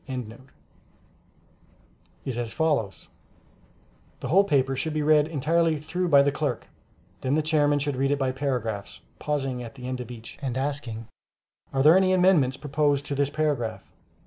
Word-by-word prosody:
] - - -36 2.2
is 130 - -3
as 120 -1 -3
follows: 150 -11 -1 1.1
The - - -5
whole 195 +5 +5
paper 135 -7 +1
should 155 +4 -3
be 155 - 0
read 150 0 +4
entirely 160 +1 +1
through 175 +5 -2
by 140 -4 +6
the 140 - +2
clerk; - - -2 0.6
then 135 +2 0
the 155 - +1
Chairman 150 -2 +2
should 145 -1 -1
read 135 +1 +1
it 145 - +1
by 135 -2 0
paragraphs, 125 -7 -3 0.2
pausing 135 -4 -2
at 115 +1 -9
the 125 -2 -8
end 130 -1 -3
of 125 - -8
each, 115 -2 -10
and 130 -3 -3
asking, 130 -5 -3 0.6
"Are 135 0 +1
there 155 +4 +7
any 190 0 +3
amendments 175 -8 +3
proposed 145 -1 0
to 145 - -3
this 140 0 +1
paragraph?" 145 -6 -1
140 Hz, 165 wpm, -26 LUFS, 130-155 Hz, 2.2 s, there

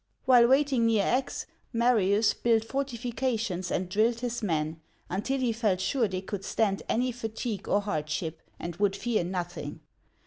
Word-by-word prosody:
While 245 -2 +7
waiting 265 -3 +3
near 215 -3 +3
Aix, 260 +1 0 0.3
Marius 220 -3 +3
built 225 -2 +2
fortifications 235 -7 -2
and 185 - -1
drilled 225 +5 +1
his 240 -1 -2
men, 160 -4 -1 0.3
until 225 +9 -1
he 245 -3 +1
felt 215 -5 +1
sure 230 +5 +1
they 185 -1 -3
could 195 0 -5
stand 195 -1 0
any 250 +2 +1
fatigue 225 -3 -4
or 205 - +3
hardship, 160 -4 -3 0.2
and 170 -1 -5
would 200 -1 +2
fear 235 -6 0
nothing. 175 -4 -4
220 Hz, 150 wpm, -28 LUFS, 185-240 Hz, 0.3 s, While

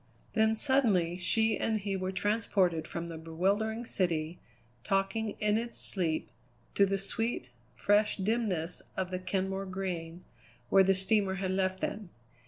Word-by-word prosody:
Then 220 -1 +3
suddenly 215 - +3
she 220 +4 +2
and 220 -1 0
he 200 -1 -2
were 185 0 -2
transported 190 -5 +1
from 170 0 -4
the 165 -1 -7
bewildering 200 +8 -1
city, 170 -5 -1 0.4
talking 200 - 0
in 210 +1 +2
its 235 0 -5
sleep, 165 -5 -1 0.4
to 200 - +4
the 195 0 0
sweet, 195 - -3 0.2
fresh 205 +1 +2
dimness 195 -5 -1 0.2
of 185 -1 -2
the 185 - -2
Kenmore 190 +1 -2
Green, 180 -3 -4 0.5
where 195 - +6
the 195 0 +3
steamer 190 0 +2
had 190 -1 -2
left 190 0 0
them. 205 -4 -3
195 Hz, 145 wpm, -31 LUFS, 180-215 Hz, 0.5 s, where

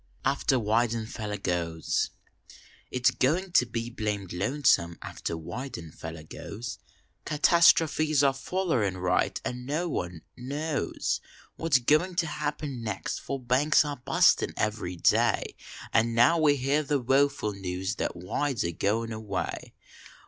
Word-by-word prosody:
AFTEK 140 -1 +2
WE1DENFELLER 110 -2 -1
GOES 85 -3 -1 0.8
It 125 -1 -4
s - - +7
goin 175 +8 0
to 125 -7 +4
be 115 0 -4
blamed 105 -5 -3
lonesome 95 - +2
after - - -5
Weidenfeller 80 - -7
goes; 110 +8 -7 0.5
Catastrofies 155 -1 +4
are 135 -1 +4
follerin 135 - -1
right 90 0 +1
along 125 - -3
an 125 - -10
no 155 +5 -1
one 90 - -4
knows 145 +4 -2 0.3
What 165 -2 -4
s - - +7
goin 155 +8 +2
to 170 - +1
happen 150 -4 -4
next, 105 -4 -3
for 140 - -4
banks 130 +5 +3
are 145 -1 -4
bustin 125 - +3
every 105 -4 -1
day 85 - +2 0.4
An 115 +1 +2
now 140 +9 +5
we 150 -2 +4
hear 140 +3 +1
the 145 0 0
woeful 135 -3 +2
news 95 +1 -3
that - - -2
Weld 110 +11 -2
s - - 0
agoin 105 +7 -1
away. 100 -6 -4
120 Hz, 135 wpm, -28 LUFS, 100-145 Hz, 0.8 s, s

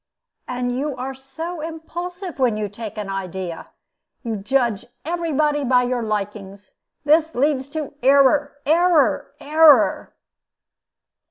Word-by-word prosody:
And 245 0 -2
you 280 +1 -2
are 255 +1 -5
so 305 +6 -7
impulsive 345 +2 -6
when 240 -5 +2
you 210 -1 -2
take 215 +2 -8
an 210 -2 -4
idea! 190 -3 -5 0.6
You 230 -3 -3
judge 235 0 0 0.2
every 335 0 -2
body 295 0 +1
by 250 -1 +3
your 245 0 -1
likings. 205 -2 -5 0.3
That 315 +2 +3
leads 270 0 +1
to 300 -1 -5
error, 280 +2 +4
error, 330 0 +3
error." 300 -5 +4
270 Hz, 120 wpm, -21 LUFS, 225-310 Hz, 0.6 s, error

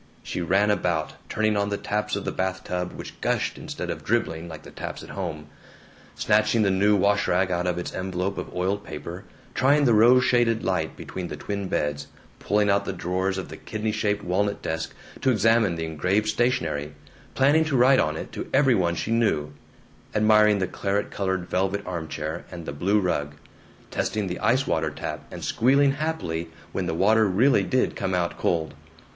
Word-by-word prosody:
She - - -4
ran 95 +5 +3
about, 85 -6 0 0.2
turning 110 0 +1
on 100 0 +1
the 100 - -1
taps 105 +1 -2
of - - -4
the - - -1
bathtub, 90 -1 -2
which - - -9
gushed - - 0
instead - - -5
of - - -6
dribbling 80 +1 -1
like 80 -2 -9
the - - -12
taps - - -6
at - - -10
home, 80 -6 -5 0.7
snatching 110 +1 +3
the 100 - +3
new 100 +2 +3
wash 100 +1 +2
rag 95 +1 +2
out 90 0 0
of 90 -1 0
its 90 - -4
envelope 95 +1 -2
of - - -6
oiled 95 +3 -1
paper, 90 +4 -7 0.3
trying 145 +2 +3
the 120 - +5
rose 120 +4 +6
shaded 120 -2 +2
light - - -1
between 90 -2 -6
the 75 - -6
twin 100 +4 -4
beds, 75 -5 -2 0.3
pulling 105 0 +1
out 100 0 +2
the - - -3
drawers 95 +2 -1
of 95 - -5
the - - -8
kidney 110 0 -3
shaped 105 -1 -1
walnut 100 +3 0
desk 80 0 -3 0.3
to 130 - +2
examine 115 -4 +3
the 80 0 -3
engraved 90 +7 0
stationery, 80 -11 0 0.4
planning 145 +4 +4
to 145 -4 +1
write 130 +2 +6
on 75 0 +1
it - - -7
to - - -6
every 135 -1 +4
one 85 -5 +1
she 110 - -3
knew, 80 -11 +1 0.6
admiring 105 0 +5
the 95 - 0
claret 100 +2 -2
colored 95 -2 -2
velvet 95 +2 -1
armchair 80 -2 -4
and 85 -2 -8
the 70 - -5
blue 95 +9 +2
rug, 75 -6 -1 0.6
testing 105 -1 -1
the 90 -1 -4
ice 130 +4 +2
water 80 - 0
tap, - - -6
and - - -8
squealing 140 +4 +3
happily 135 - -3 0.2
when - - -2
the - - -1
water 110 +4 +4
really 105 +5 +4
did 100 +7 0
come 95 - -1
out 85 -1 0
cold. 80 -3 0
95 Hz, 190 wpm, -25 LUFS, 85-110 Hz, 0.7 s, rose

